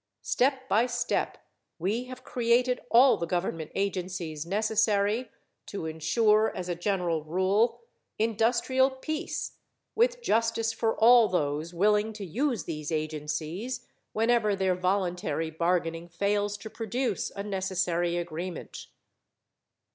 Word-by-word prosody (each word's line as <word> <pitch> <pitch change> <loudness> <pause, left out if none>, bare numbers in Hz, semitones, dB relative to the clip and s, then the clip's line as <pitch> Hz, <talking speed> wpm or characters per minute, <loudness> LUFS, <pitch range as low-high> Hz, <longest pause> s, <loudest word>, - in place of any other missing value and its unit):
Step 260 - +1
by 230 +2 +3
step 240 -1 -1 0.4
we 210 +9 -1
have 255 0 -10
created 245 +1 +2
all 250 +3 +6
the 170 - -3
government 165 -3 -2
agencies 180 -5 -3
necessary 215 +3 +1 0.4
to 195 -5 -5
insure, 210 +8 +2
as 180 - -4
a 175 - -1
general 175 -3 -1
rule, 195 +8 +1 0.4
industrial 235 +4 +2
peace, 305 +4 -4 0.4
with 485 +2 +2
justice 225 - +1
for 225 0 0
all 235 0 +7
those 155 -2 -1
willing 210 +4 +2
to 210 -2 -6
use 235 - -1
these 155 -1 -5
agencies 155 - -3 0.3
whenever 225 -2 +2
their 190 -1 +1
voluntary 180 -3 -1
bargaining 170 0 -1
fails 205 +3 0
to 220 - -9
produce 225 +4 -2
a 200 - -4
necessary 185 -3 -1
agreement. 175 +1 -5
200 Hz, 115 wpm, -28 LUFS, 175-230 Hz, 0.4 s, all